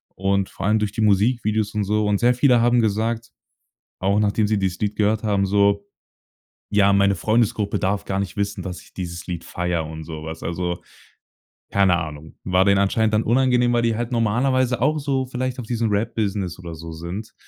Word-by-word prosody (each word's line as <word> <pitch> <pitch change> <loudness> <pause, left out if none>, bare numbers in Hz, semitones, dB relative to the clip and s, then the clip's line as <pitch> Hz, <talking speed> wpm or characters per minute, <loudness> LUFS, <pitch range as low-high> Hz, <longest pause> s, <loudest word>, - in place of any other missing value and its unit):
und 95 0 0
vor 95 - -4
allem 110 +1 +3
durch 105 -2 -1
die 110 - -3
Musikvideos 110 0 +2
und 105 -1 -1
so. 105 +1 +1
Und 100 -1 +1
sehr 120 +1 +3
viele 125 -2 +4
haben 120 0 +4
gesagt, 115 +2 -1 0.7
auch 100 +2 +2
nachdem 105 0 +1
sie 105 0 +1
dieses 95 -2 -1
Lied 105 0 -1
gehört 105 +1 +1
haben, 100 -2 +1
so: 100 0 +2 0.8
„Ja, 100 -1 +4
meine 100 0 +3
Freundesgruppe 110 +1 +1
darf 100 +2 -1
gar 95 - -2
nicht 100 0 -5
wissen, 100 0 -2
dass 90 -2 -6
ich - - -20
dieses 85 -2 -6
Lied 85 -2 -4
feiere.“ 90 -2 -2
und 80 0 -8
so 80 -1 -7
was. 80 +1 -7
Also, 85 +1 -3 0.9
keine 95 -3 +3
Ahnung. 80 -2 -8
War 90 0 +2
denen 100 -1 +4
anscheinend 110 +2 +1
dann 105 - +3
unangenehm, 125 0 +3
weil 120 0 +2
die 115 -1 +1
halt 120 +2 -3
normalerweise 125 +2 +1
auch 150 +4 +2
so 135 -2 -1
vielleicht 130 0 -3
auf 120 - -6
diesem 115 -2 0
Rap-Business 100 -4 -1
oder 85 -2 -7
so 80 +1 -8
sind, 85 +7 -7
105 Hz, 195 wpm, -22 LUFS, 95-115 Hz, 0.9 s, viele